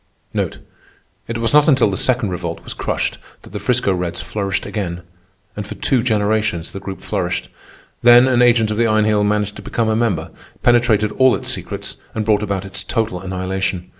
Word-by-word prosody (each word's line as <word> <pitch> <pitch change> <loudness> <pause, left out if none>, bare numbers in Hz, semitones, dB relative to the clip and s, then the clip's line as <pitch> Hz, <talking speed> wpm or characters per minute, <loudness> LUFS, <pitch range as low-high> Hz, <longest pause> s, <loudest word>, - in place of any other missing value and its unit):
It 100 +7 -7
was 115 +2 -1
not 150 0 +6
until 130 -8 +4
the - - -2
Second 120 -1 +1
Revolt 85 -2 -4
was - - -6
crushed, - - -2 0.2
that - - -14
the 105 - -5
'Frisco 105 -1 +1
Reds 90 -2 -3
flourished 95 +1 -3
again. 90 -4 -4 0.5
And 105 -1 -5
for - - -7
two 130 -3 +1
generations 105 -6 0
the 95 - -6
Group 95 -1 -7
flourished. 90 -4 -2 0.5
Then 120 +1 +7
an 125 -2 +3
agent 115 -3 +4
of 105 - -2
the 115 0 +3
Iron 110 -1 +3
Heel 105 -1 +2
managed 105 0 0
to - - -8
become 115 -2 -1
a 110 - +2
member, 110 -9 0 0.3
penetrated 115 -3 +3
all 130 -1 +6
its - - -4
secrets, - - -5 0.2
and 110 -1 -1
brought 105 -1 +3
about 100 -2 -2
its 95 +1 -3
total 110 -6 -2
annihilation. 95 -1 -3
105 Hz, 190 wpm, -19 LUFS, 95-115 Hz, 0.5 s, Then